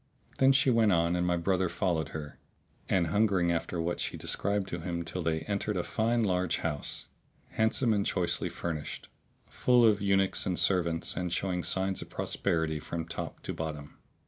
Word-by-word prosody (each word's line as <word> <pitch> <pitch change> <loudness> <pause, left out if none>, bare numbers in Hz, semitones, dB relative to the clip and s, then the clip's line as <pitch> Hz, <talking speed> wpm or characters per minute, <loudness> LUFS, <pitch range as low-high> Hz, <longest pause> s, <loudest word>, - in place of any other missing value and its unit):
Then 135 0 +6
she 135 -1 +4
went 115 -3 +4
on 85 0 +2
and 90 0 0
my 90 0 +2
brother 95 +1 +1
followed 85 -2 -1
her, 75 -2 -7 0.5
an 95 -3 +3
hungering 95 -1 +2
after 85 +1 -2
what 85 +1 -1
she - - -3
described 100 -1 -1
to 85 - -4
him 85 0 -3
till 85 +2 -4
they 80 -1 0
entered 100 +3 -2
a 90 - 0
fine 115 +1 +1
large 90 -4 +1
house, 75 -4 -3 0.4
handsome 110 +1 +2
and 100 -1 +1
choicely 90 -3 0
furnished, 80 -3 -5 0.4
full 125 -1 +3
of 105 -3 +4
eunuchs 95 -1 +2
and 90 -2 0
servants 85 -3 +1
and 90 -1 -2
showing 90 0 -1
signs 95 +2 0
of - - -9
prosperity 80 -2 -1
from 80 +2 -4
top 80 -1 -6
to - - -3
bottom. 75 -2 -6
90 Hz, 175 wpm, -30 LUFS, 85-100 Hz, 0.5 s, Then